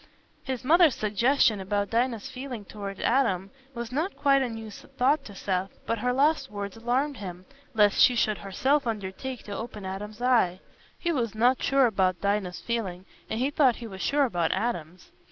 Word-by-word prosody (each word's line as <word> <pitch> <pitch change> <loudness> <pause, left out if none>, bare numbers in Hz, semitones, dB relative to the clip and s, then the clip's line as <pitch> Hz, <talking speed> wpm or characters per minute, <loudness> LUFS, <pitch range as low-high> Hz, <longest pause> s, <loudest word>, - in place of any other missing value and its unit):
His 260 -1 -4
mother's 320 0 +5
suggestion 220 +2 +2
about 200 +1 -1
Dinah's 230 -2 0
feeling 250 -5 -7
towards 200 -1 -7
Adam 200 -7 +1 0.2
was 235 0 -5
not 315 +9 -2
quite 275 -1 +4
a 255 - 0
new 225 -1 -7
thought 275 +7 0
to 205 - -10
Seth, 190 0 -2
but 230 - -1
her 250 +3 +1
last 280 +1 +2
words 200 -1 -5
alarmed 250 +5 -1
him, 185 -3 -8 0.3
lest 210 -1 +4
she 250 - +6
should 215 -2 +1
herself 260 +8 0
undertake 225 +4 -4
to 205 - -6
open 215 -3 -6
Adam's 210 +3 -6
eyes. 240 -8 +3 0.4
He 345 - -1
was 235 -8 -1
not 245 +4 +3
sure 275 -1 +4
about 190 -5 +1
Dinah's 200 -3 -1
feeling, 195 -6 -3 0.2
and 220 - -2
he 265 +3 +1
thought 270 -5 +4
he 235 - -8
was 190 -4 -8
sure 285 0 +2
about 175 -9 0
Adam's. 185 -5 -4
225 Hz, 180 wpm, -27 LUFS, 200-260 Hz, 0.4 s, she